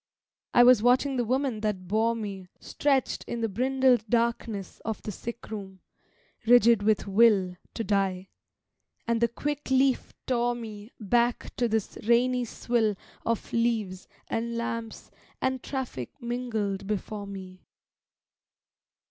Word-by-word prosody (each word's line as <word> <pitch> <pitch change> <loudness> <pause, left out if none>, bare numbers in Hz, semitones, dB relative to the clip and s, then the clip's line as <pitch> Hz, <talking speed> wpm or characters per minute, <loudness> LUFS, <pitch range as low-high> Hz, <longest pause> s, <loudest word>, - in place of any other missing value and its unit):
I 240 - +8
was 245 -3 +7
watching 255 +3 +3
the 245 - +2
woman 255 -1 0
that 210 -4 -2
bore 220 +4 +2
me 200 -4 -6
Stretched 275 -3 0
in 235 - -4
the 225 - +1
brindled 255 +2 +2
darkness 230 -4 -1
Of 220 -1 -4
the 210 - -4
sick 235 +3 -8
room, 190 -3 -7 0.7
rigid 235 -2 +6
with 215 0 +2
will 200 -3 +4 0.2
To 225 - -2
die: 195 -3 0 0.8
and 230 0 +1
the 235 - +5
quick 290 +5 -4
leaf 265 0 +2
tore 240 -1 +1
me 215 -1 -8
Back 235 +3 +1
to 240 - +2
this 220 -2 -2
rainy 245 +1 +3
swill 225 -2 0 0.3
Of 230 -1 -2
leaves 220 -6 0 0.2
and 235 +1 -2
lamps 230 -1 -5 0.3
and 260 -1 -1
traffic 260 - -5
mingled 225 -6 -3
before 210 0 -3
me. 185 -2 -10
230 Hz, 130 wpm, -27 LUFS, 205-245 Hz, 0.8 s, I